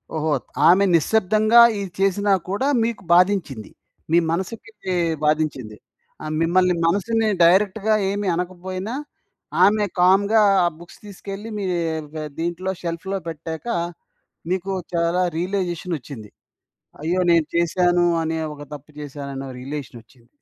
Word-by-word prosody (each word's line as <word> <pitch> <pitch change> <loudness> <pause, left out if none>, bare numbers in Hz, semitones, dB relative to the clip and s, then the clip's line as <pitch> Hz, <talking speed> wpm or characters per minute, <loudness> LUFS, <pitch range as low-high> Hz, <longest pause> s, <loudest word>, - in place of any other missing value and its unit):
ఓహో! 155 -1 0 0.3
ఆమె 185 +4 +6
నిశ్శబ్దంగా 215 +6 +4 0.2
ఇది 200 -1 -4
చేసినా 195 +1 +2 0.2
కూడా 205 +8 -1 0.2
మీకు 230 -1 -2
బాధించింది. 175 - +1 0.4
మీ 170 - +5
మనసుకిదీ 190 +2 -4 0.3
బాధించింది. 150 -8 -1 0.5
ఆహ్, 155 - -4
మిమ్మల్ని 180 +2 +3
మనసుని 220 +6 +1 0.2
డైరెక్ట్‌గా 200 +4 +3 0.2
ఏమీ 205 0 -2
అనకపోయినా, 185 +4 -4 0.7
ఆమె 210 +2 +4 0.2
కామ్‌గా 200 +4 +4 0.2
ఆ - - +4
బుక్స్ 170 +1 -15
తీసుకెళ్లి 200 +2 -8
మీ 200 - -3 0.5
గ 155 -1 -4
దీంట్లో 175 +3 -2
షెల్ఫ్‌లో 180 +4 -3
పెట్టాక, 160 +4 -6 0.9
నీకు 190 +1 -2 0.2
చాలా 170 +2 +1
రియలైజేషనొచ్చింది. 170 - -4 0.7
అయ్యో! 175 +4 0
నేను 165 -3 +3
చేశాను 175 +1 +2 0.2
అనే 160 0 -2 0.2
ఒక 145 - -11
తప్పు 145 +1 -12
చేశాననే 140 -2 -7
రియలేషనొచ్చింది. 125 -4 -9
180 Hz, 110 wpm, -22 LUFS, 160-200 Hz, 0.9 s, ఆమె